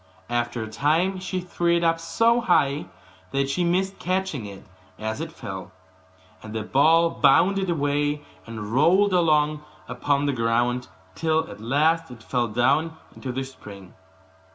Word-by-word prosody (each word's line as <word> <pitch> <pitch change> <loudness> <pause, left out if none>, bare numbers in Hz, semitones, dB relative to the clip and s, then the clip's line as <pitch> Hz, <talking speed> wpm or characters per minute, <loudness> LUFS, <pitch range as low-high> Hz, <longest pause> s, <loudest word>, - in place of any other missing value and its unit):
After 120 -1 -1
a - - -6
time 155 - +1
she 185 0 -3
threw 175 -1 0
it 170 - -1
up 165 0 +2
so 230 +8 +2
high 145 -10 +2 0.4
that 135 +3 -1
she 175 - 0
missed 190 +3 0
catching 185 - -2
it 100 -1 -10 0.3
as 110 0 -4
it - - -5
fell; - - -8 0.7
and 110 0 -9
the 110 - -2
ball 160 +8 +4
bounded 190 +7 +3
away, 145 -1 0 0.2
and 110 -1 -6
rolled 185 +9 +4
along 155 -3 +2 0.2
upon 140 +3 0
the 140 - +1
ground, 120 +1 0 0.3
till 160 0 0
at - - -11
last 155 +7 +1
it 120 -3 -12
fell 120 -1 0
down 140 +9 +1 0.2
into 130 - -5
the 130 +2 -3
spring. 100 -8 -12
145 Hz, 155 wpm, -24 LUFS, 120-170 Hz, 0.7 s, ball